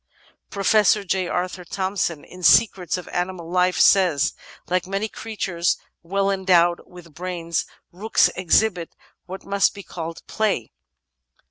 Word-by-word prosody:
Professor 205 +1 +3
J. 185 -1 -1
Arthur 180 +1 -3
Thomson, 185 -3 -2
in 180 - -13
Secrets 180 -2 +4
of 180 - -9
Animal 175 -1 -3
Life, 180 0 +2
says: 175 -8 +4 0.3
''Like 180 0 -1
many 195 +3 -2
creatures 195 -6 -2 0.2
well 195 +3 0
endowed 180 -3 +3
with 175 -3 -14
brains, 170 0 -3 0.2
rooks 205 +6 +2
ex 185 +3 +4
hibit 180 -7 -3 0.4
what 190 +1 -8
must 200 0 +1
be 200 - -9
called 165 -2 -7
play. 210 - -1
185 Hz, 130 wpm, -22 LUFS, 175-195 Hz, 0.4 s, Secrets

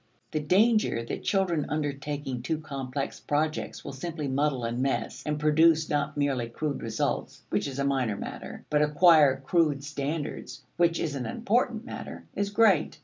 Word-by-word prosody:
The 155 - 0
danger 195 - +3
that - - -4
children 175 -7 +1
undertaking 145 -3 -3
too 155 +5 -1
complex 140 -3 -4
projects 155 +1 -2
will - - -5
simply 155 +2 -4
muddle 135 -1 0
and 115 +1 -2
mess, 135 0 -1
and 150 0 -1
produce 160 +1 +4
not 145 0 -1
merely 135 -5 0
crude 145 +4 -3
results 110 -1 -2
(which - - 0
is 135 -1 -6
a 140 - 0
minor 130 -7 0
matter) - - -7
but 150 0 +3
acquire 150 -3 +5
crude 145 -1 +1
standards 150 +1 -4
(which 170 -1 +2
is 155 -3 -1
an 135 -3 -3
important 235 0 0
matter) - - -7
is 200 0 -1
great. 205 -6 +3
150 Hz, 160 wpm, -28 LUFS, 140-165 Hz, -, acquire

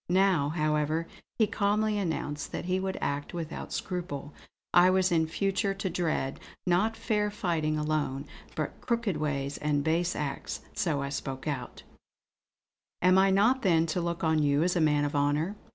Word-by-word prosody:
Now, 185 -5 +3
however, 155 +1 0 0.3
he 220 - +5
calmly 210 +1 +1
announced 155 -5 -3
that - - -3
he 185 +1 +1
would 190 0 -2
act 145 +3 -2
without 165 -2 -5
scruple. 150 -6 -4 0.4
I 175 +1 +7
was 185 0 +3
in 160 -2 +3
future 195 +3 0
to 195 -1 -2
dread, 155 -6 -1 0.3
not 195 +5 +2
fair 215 -2 0
fighting 170 -7 -1
alone, 150 -3 -1 0.3
but - - -4
crooked 235 -8 0
ways 140 -2 -2
and 145 -1 +1
base 170 +3 +1
acts. 145 -2 -4
So 165 -10 0
I 140 - -3
spoke 135 0 -5
out: 140 -4 -4 1.2
"Am 185 +1 +6
I 195 0 +5
not 220 +7 +4
then 165 -7 +3
to 180 - 0
look 170 0 -3
on 160 -1 +3
you 145 +1 +3
as 180 +1 +1
a 175 - +2
man 150 -2 +3
of 145 - -3
honour?" 145 +7 +1
165 Hz, 170 wpm, -29 LUFS, 150-190 Hz, 1.2 s, I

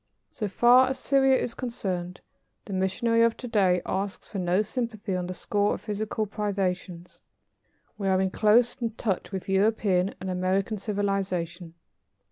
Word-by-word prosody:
So 215 - -3
far 240 +6 +5
as 265 - -2
Syria 270 0 +3
is 235 - -3
concerned, 185 -8 -4 0.4
the 200 - -6
missionary 190 +5 +1
of 230 0 +3
to 250 - -7
day 190 -6 +2
asks 195 +1 -3
for 200 - -5
no 180 +3 +2
sympathy 220 -3 -3
on 180 -1 -2
the 185 - -4
score 205 +2 0
of - - -10
physical 215 0 -2
privations. 190 -4 -3 0.8
We 195 - -1
are 190 -1 +3
in 190 0 +1
close 230 +4 +4 0.2
touch 200 -4 -2
with 190 -2 -5
European 195 -1 +2
and 190 - -6
American 190 +3 0
civilization. 190 -4 -2
200 Hz, 150 wpm, -27 LUFS, 185-225 Hz, 0.8 s, far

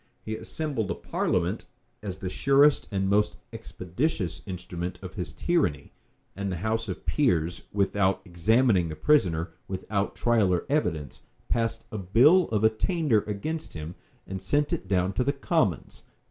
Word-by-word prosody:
He 110 - -3
assembled 135 -4 -3
a - - -1
parliament, - - -1 0.4
as 95 -3 -5
the 95 - -5
surest 140 +9 +4
and 95 -2 -1
most 105 +2 +2 0.2
expeditious 105 - -3
instrument 90 -1 -5
of 95 - -7
his 90 - -5
tyranny; 90 - 0 0.4
and 100 -1 -3
the 90 - -2
house 110 +1 0
of 95 - -6
peers, 85 - +1
without 100 -1 +1
examining 95 +1 +2
the 80 - -5
prisoner, 85 - +2 0.2
without 100 +1 -2
trial 115 -6 +2
or 90 - 0
evidence, 80 - -1 0.3
passed 115 -1 -1
a 110 - -4
bill 130 - +5
of 110 -1 0
attainder 110 - +2
against 155 +11 -4
him, 80 +1 -6 0.3
and 95 -1 -6
sent 145 +9 +1
it - - -3
down 95 0 +1
to 110 - +1
the 140 +2 +1
commons. 140 - -1
100 Hz, 150 wpm, -27 LUFS, 90-125 Hz, 0.4 s, bill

